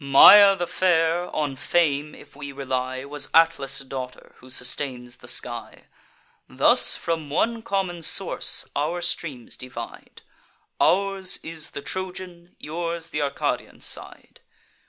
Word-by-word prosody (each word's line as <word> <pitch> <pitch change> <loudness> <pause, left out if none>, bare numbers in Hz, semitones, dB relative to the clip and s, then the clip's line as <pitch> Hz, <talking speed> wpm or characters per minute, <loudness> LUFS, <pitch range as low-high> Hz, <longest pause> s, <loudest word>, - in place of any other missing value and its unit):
Maia 195 +9 +9
the 175 -2 -2
fair, 175 -1 +1
on 145 -3 -1
fame 150 0 0
if - - -16
we 140 -1 -7
rely, 130 -1 -3
Was 145 0 -2
Atlas' 165 -4 +3
daughter, 130 -2 -8
who 130 - -16
sustains 125 -1 -4
the - - -14
sky. - - -3 0.7
Thus - - +5
from 160 -3 -3
one 230 +10 0
common 195 -6 -2
source - - +1
our 165 +5 -1
streams 150 -8 -2
divide; 125 0 -9 0.6
Ours 195 0 +1
is 160 -2 -3
the 140 - -6
Trojan, 180 -2 -7
yours 165 +1 -4
th' 150 - -2
Arcadian 140 -1 -3
side. - - -7
160 Hz, 125 wpm, -24 LUFS, 140-175 Hz, 0.7 s, Maia